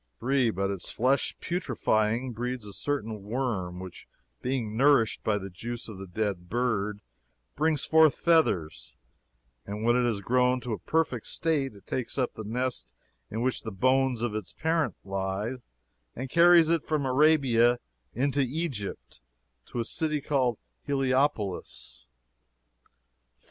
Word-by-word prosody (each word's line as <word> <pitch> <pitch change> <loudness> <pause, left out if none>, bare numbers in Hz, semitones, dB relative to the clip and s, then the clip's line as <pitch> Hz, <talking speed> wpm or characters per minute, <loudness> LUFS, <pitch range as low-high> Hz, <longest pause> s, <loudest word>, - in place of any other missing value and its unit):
"3. 130 0 +2
But 100 -1 -1
its 95 -3 -3
flesh, 130 +4 +1
putrefying, 120 -7 0
breeds 120 0 -4
a 100 - -8
certain 110 -2 -3
worm, 105 -5 -2
which, 95 -2 -9 0.3
being 125 -5 -2
nourished 135 -3 +3
by 105 -1 +1
the 95 -1 -7
juice 120 +6 -6
of 105 -4 -9
the 95 - -7
dead 90 -2 -3
bird, 105 -3 -1 0.5
brings 155 -1 +1
forth 160 -2 +5
feathers; 105 - +1 0.7
and 105 +2 -6
when 120 +1 +4
it 125 -1 +2
is 105 -3 -2
grown 125 +4 +2
to 120 -2 -3
a - - -4
perfect 155 -8 -1
state, 145 -8 0
it 100 - -16
takes 130 +1 -3
up 130 -2 0
the 110 - -7
nest 125 +4 -3 0.3
in 110 +3 -3
which 130 0 0
the 110 - -6
bones 130 +3 +2
of 120 -3 -1
its 105 -5 -5
parent 160 -1 0
lie, 95 +5 -3 0.6
and 130 +2 -5
carries 170 -1 +6
it 165 -2 +2
from 150 -2 -1
Arabia 130 -4 +4 0.4
into 140 +3 +1
Egypt, 130 - -3 0.5
to 120 - -5
a 115 - -1
city 155 +2 -1
called 130 -5 0 0.2
Heliopolis: 135 -7 -1 0.8
"4. - - -35
120 Hz, 145 wpm, -28 LUFS, 105-140 Hz, 0.8 s, carries